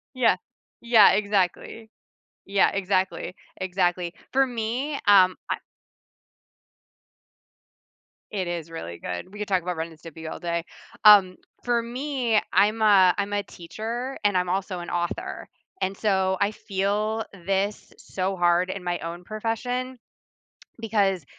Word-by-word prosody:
Yeah. 235 -6 +4 0.5
Yeah, 235 -3 +7
exactly. 205 +2 -1 0.6
Yeah, 195 0 +3
exactly, 190 -2 -1 0.2
exactly, 180 -2 -1 0.2
for 270 +1 +4
me, 250 +4 -3
um, 185 -2 +6
I - - 0 2.7
It 190 -4 -2
is 170 -2 -4
really 85 - -7
good, 90 - -6
we 210 - -11
could 210 - -3
talk 190 -2 +2
about 180 0 -3
Ren 160 0 -3
and 160 -1 -16
Stimpy 160 0 -9
all - - -7
day, 170 -1 -2 0.4
um, 200 -4 +8 0.3
for 240 -1 +1
me, 245 -1 0
I'm 210 +4 +3
a 195 -4 +6
I'm 200 0 -2
a 205 0 0
teacher 230 +10 -6
and 205 -2 +3
I'm 180 0 0
also 185 0 -2
an 175 - -7
author 175 0 -3 0.3
and, 190 +1 -1
so, 190 -2 +1
I 200 +1 +3
feel 210 +2 -1
this 195 +2 -2
so 190 +1 -3
hard 175 0 +2
in 190 0 -5
my 175 -1 -2
own 170 +1 -6
profession 240 +5 -3 0.8
because 200 -6 +1
195 Hz, 135 wpm, -25 LUFS, 180-220 Hz, 2.7 s, um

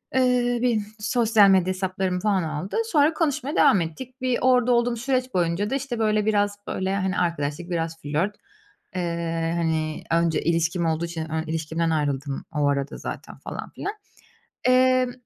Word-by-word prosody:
Eee, 250 -2 +2
benim 225 -4 +1
sosyal 220 -2 +4
medya 185 -2 +4
hesaplarımı, 185 -1 -2
falan, 195 -2 +1
aldı. 155 - -3
Sonra 300 0 +4
konuşmaya 300 -2 -1
devam 195 - +5
ettik. 255 - -7
Bir 255 -1 +1
orada 250 -1 +4
olduğum 240 0 +2
süreç 255 +1 -1
boyunca 175 +3 0
da, 270 - 0
işte, 270 -4 -3
böyle, 215 -1 +2
biraz, 205 -1 +1
böyle, 190 +1 -1
hani, 190 -2 -1
arkadaşlık, 165 0 -2
biraz 165 -2 -2
flört, 160 +8 -1 0.6
eee, 170 -2 -1
hani, 160 -2 -1
önce 165 -1 +2
ilişkim 170 +1 +1
olduğu 165 +1 0
için 160 -1 -5
ön 160 0 -1
ilişkimden 160 +1 -2
ayrıldım 145 -3 -1
o 145 -1 +2
arada 140 0 -1
zaten, - - -7
falan - - -7
filan. 410 - -5 0.7
Emm, 255 0 +4
185 Hz, 155 wpm, -24 LUFS, 165-245 Hz, 0.7 s, devam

